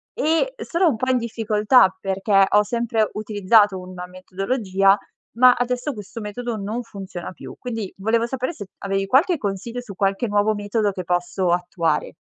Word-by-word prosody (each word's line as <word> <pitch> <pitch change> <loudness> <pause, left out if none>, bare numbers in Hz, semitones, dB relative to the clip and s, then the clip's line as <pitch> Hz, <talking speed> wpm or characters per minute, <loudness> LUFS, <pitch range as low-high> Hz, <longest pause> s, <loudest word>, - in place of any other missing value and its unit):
E, 330 +11 +1
uhm, - - -6
sono 345 0 +2
un 275 - 0
po' 255 +3 -2
in 255 - +3
difficoltà, 220 -3 +3
perché 195 +1 +2
ho 210 - +5
sempre 225 0 0
utilizzato 205 -1 +2
una 180 0 -8
metodologia, 195 +2 +1 0.4
ma 250 +1 +7
adesso 250 +3 -2
questo 210 +1 -9
metodo 230 +3 -4
non 215 +4 -4
funziona 195 -6 -8
più. - - -10
Quindi 225 -5 -5
volevo 225 +4 +1
sapere 260 +5 -3
se 205 - -9 0.2
avevi 195 0 -1
qualche 315 - +3
consiglio 210 +4 -4
su 215 -6 -10
qualche 195 +4 0
nuovo 205 +1 +2
metodo 205 0 0
che 185 -1 -6
posso 175 +1 -1
attuare. 170 -3 -1
210 Hz, 165 wpm, -22 LUFS, 195-240 Hz, 0.4 s, ma